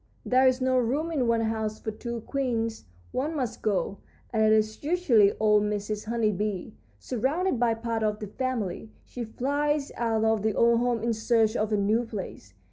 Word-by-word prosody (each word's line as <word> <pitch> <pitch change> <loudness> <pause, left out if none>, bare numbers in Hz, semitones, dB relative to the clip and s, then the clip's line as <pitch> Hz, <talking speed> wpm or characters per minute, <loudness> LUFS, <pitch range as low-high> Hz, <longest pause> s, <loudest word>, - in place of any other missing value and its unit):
"There 260 +1 +4
is 255 0 +3
not 255 0 +3
room 295 +8 -1
in 270 -7 0
one 230 0 +2
house 220 -1 -2
for 220 - -4
two 235 +2 -5
queens; 230 -4 -2 0.3
one 295 +5 -2
must 255 -6 -3
go, 200 -2 -1 0.3
and 220 - +2
it 215 - +4
is 215 +2 +1
usually 285 - +4
old 210 -1 +4
Mrs. 210 0 -2
Honey 225 -1 +1
Bee. 205 +1 -3 0.2
Surrounded 265 - -1
by 235 -2 +2
part 225 0 -3
of 210 -1 0
the 210 - -6
family, 220 -3 -3 0.2
she 245 - -6
flies 285 +5 -1
out 225 -2 0
of 220 -1 +2
the 215 0 0
old 235 0 +4
home 240 -2 0
in 235 0 +1
search 220 0 +2
of 215 -1 0
a 210 - +2
new 210 +4 +2
place. 195 - -8
225 Hz, 190 wpm, -27 LUFS, 215-255 Hz, 0.3 s, There